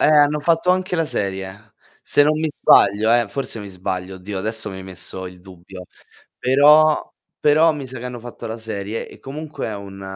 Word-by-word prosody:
Eh, - - +4
hanno 150 0 +4
fatto 165 +3 +2
anche 185 -1 0
la 165 - +1
serie. 95 -1 -4 0.3
Se 145 - +3
non 155 +1 +2
mi 160 0 -1
sbaglio, 110 -3 +4
eh, 120 -3 +3
forse 125 0 -4
mi 100 - -8
sbaglio, 95 0 -5
oddio, 95 +2 -6
adesso 110 +3 -4
mi 95 -1 -7
hai - - -8
messo 95 0 -8
il 90 0 -11
dubbio. 90 0 -12 0.5
Però 150 +4 +5 0.3
però 155 +2 +4
mi 145 -3 -6
sa 130 0 -8
che 125 - -6
hanno 125 -1 -6
fatto 120 0 -9
la 110 0 -5
serie 110 -1 -5
e - - -14
comunque 150 +3 -6
è 110 - -4
un 100 -1 -9
110 Hz, 200 wpm, -21 LUFS, 95-150 Hz, 0.5 s, Però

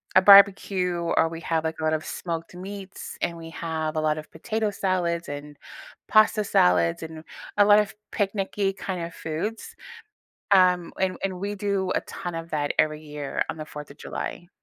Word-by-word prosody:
a 185 - +8
barbecue 195 -2 +6
or 165 -1 +2
we 165 0 -7
have, 165 -2 0
like, 160 0 -3
a - - -4
lot 155 0 +2
of 155 0 -1
smoked 165 0 -5
meats, 195 +1 -8
and 170 -1 -1
we 165 0 -9
have 160 -2 -3
a 155 - +1
lot 155 0 +1
of 155 - -8
potato 220 +6 -2
salads 180 -4 -1
and 145 0 -7 0.5
pasta 215 0 +5
salads 90 - +3
and 160 -1 -8 0.3
a 205 - +7
lot 205 0 +7
of 210 +1 -1 0.2
picnicky 195 -1 -1
kinda 175 -3 -4
foods. 165 +9 -5 0.8
Um, 180 -3 +4
and 190 -1 0
and 185 -2 -3
we 205 +1 -3
do 195 -2 -1
a - - +2
ton 175 -1 -6
of 165 0 -6
that 145 -2 0
every 155 0 +2
year 150 -2 -3
on - - -7
the 155 -1 -7
Fourth 150 -1 -9
of 140 - -12
July. 175 - -6
170 Hz, 185 wpm, -25 LUFS, 155-195 Hz, 0.8 s, a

